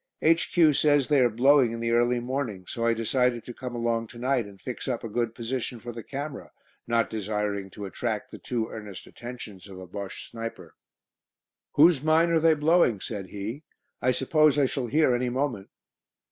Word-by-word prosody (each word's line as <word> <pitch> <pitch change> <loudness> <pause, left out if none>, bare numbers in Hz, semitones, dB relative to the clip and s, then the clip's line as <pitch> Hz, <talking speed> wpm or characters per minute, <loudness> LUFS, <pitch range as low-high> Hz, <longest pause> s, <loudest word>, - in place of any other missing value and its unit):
"H.Q. 165 -1 +4
says 145 -2 +3
they 145 -2 +4
are 120 - +5
'blowing' 125 +1 +4
in 115 - -5
the 115 0 -1
early 120 +1 +3
morning, 120 -7 -3
so 115 +5 -2
I 115 - +3
decided 120 0 +1
to 120 - -7
come 125 0 -6
along 115 -1 -1
to 120 - -13
night 125 -2 0
and 100 -1 -14
fix 125 +5 -6
up 125 -3 -2
a - - -3
good 115 +1 -2
position 120 0 -3
for 120 +1 -7
the 115 0 -7
camera, 140 +3 -6 0.4
not 115 -1 +2
desiring 105 -2 -3
to 100 +2 -8
attract 110 +2 -3
the - - -9
too 115 -3 -2
earnest 105 -3 -8
attentions 120 -6 -9
of 95 -2 -10
a 95 - -8
Bosche 100 +2 -7
sniper." 115 0 -7 1.0
"Whose 155 -1 +6
mine 160 +2 +3
are 165 - +4
they 160 0 +4
blowing?" 150 - +3
said 100 -2 -5
he. 105 - -6 0.4
"I 125 - +2
suppose 150 +4 +3
I 145 - +4
shall 130 -1 -2
hear 150 +1 +3
any 125 +1 0
moment." 125 -6 -2
120 Hz, 190 wpm, -27 LUFS, 110-140 Hz, 1.0 s, Whose